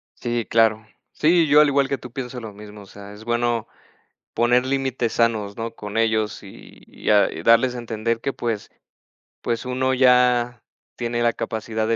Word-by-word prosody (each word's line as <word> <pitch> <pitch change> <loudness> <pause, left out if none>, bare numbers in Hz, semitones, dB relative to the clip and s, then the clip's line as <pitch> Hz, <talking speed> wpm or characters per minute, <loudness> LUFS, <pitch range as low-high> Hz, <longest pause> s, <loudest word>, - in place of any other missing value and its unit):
Sí, 120 -1 -3
claro. 110 -1 +2 0.3
Sí, 165 0 +3
yo, 150 +1 +6
al 150 - +5
igual 140 -1 +2
que 140 - -1
tú 125 - -11
pienso 125 -1 -6
lo 110 -3 -9
mismo, 105 0 -12
o - - -13
sea, 100 +1 -12
es 105 +2 -12
bueno 120 -1 0 0.7
poner 120 +2 +2
límites 130 -3 -1
sanos, 110 -4 0
¿no?, 115 0 -4
con 105 0 -6
ellos 110 -1 0
y 95 - -14
-y - - -6
a 105 -1 +5 0.2
darles 115 +2 +4
a - - -4
entender 115 0 -3
que 135 - -1
pues 115 -4 -4 0.7
pues 115 0 -2
uno 130 +1 0
ya 125 -2 +3 0.3
tiene 120 0 -2
la 120 -1 +2
capacidad 110 0 -3
de 115 - +1
115 Hz, 180 wpm, -22 LUFS, 110-125 Hz, 0.7 s, yo